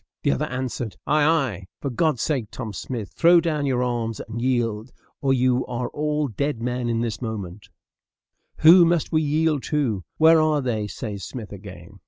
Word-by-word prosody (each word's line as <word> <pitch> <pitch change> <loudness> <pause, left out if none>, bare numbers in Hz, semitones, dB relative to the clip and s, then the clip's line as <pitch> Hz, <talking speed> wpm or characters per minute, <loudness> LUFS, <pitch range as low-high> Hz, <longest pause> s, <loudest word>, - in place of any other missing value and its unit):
The - - +3
other 70 - 0
answered, 125 -3 -4
"Ay, 150 +1 +2
ay; 135 - +1
for 140 - -3
God's 150 0 +1
sake, 135 -8 -1
Tom 110 -5 -6
Smith, 115 -4 -5
throw 170 +1 +5
down 155 -4 -1
your 125 -2 +1
arms 115 -3 -2
and 115 +1 -6
yield, 120 -2 -1 0.3
or 135 - +1
you 130 -1 +2
are 125 0 -3
all 150 0 -1
dead 140 +2 -2
men 120 -1 -1
this 115 0 -3
moment," 105 -4 -6 0.9
"Who 170 +3 +9
must 170 -1 +1
we 155 -1 +2
yield 155 -1 +1
to? 125 - -1
Where 160 0 +6
are 155 -2 +2
they?" 110 -4 -1
says 105 -3 -6
Smith 115 -5 -7
again. 100 -1 -11
125 Hz, 175 wpm, -23 LUFS, 110-150 Hz, 0.9 s, Who